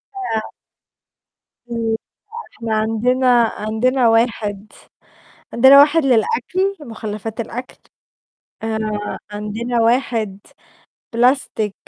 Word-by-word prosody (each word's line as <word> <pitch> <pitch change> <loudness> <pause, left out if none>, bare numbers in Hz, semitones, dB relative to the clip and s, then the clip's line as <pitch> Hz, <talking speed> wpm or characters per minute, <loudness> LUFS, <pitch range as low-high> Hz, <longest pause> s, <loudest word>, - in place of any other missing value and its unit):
أع 225 - -3 1.2
إمم، 235 - -4
لأ، 225 - +1 0.6
إحنا 225 -1 -2
عندنا 225 +4 +1 0.2
عندنا 235 +4 0
واحد 220 -3 0 0.8
عندنا 265 +4 +7
واحد 300 +2 +4
للأكل، 375 - +1
مُخلَّفات 220 -4 -6
الأكل. 245 +3 -6 0.9
آآ 215 -2 -3
عندنا 225 +3 -2
واحد 225 -4 0 0.7
بلاستيك 235 -4 +1
230 Hz, 80 wpm, -19 LUFS, 215-255 Hz, 1.2 s, عندنا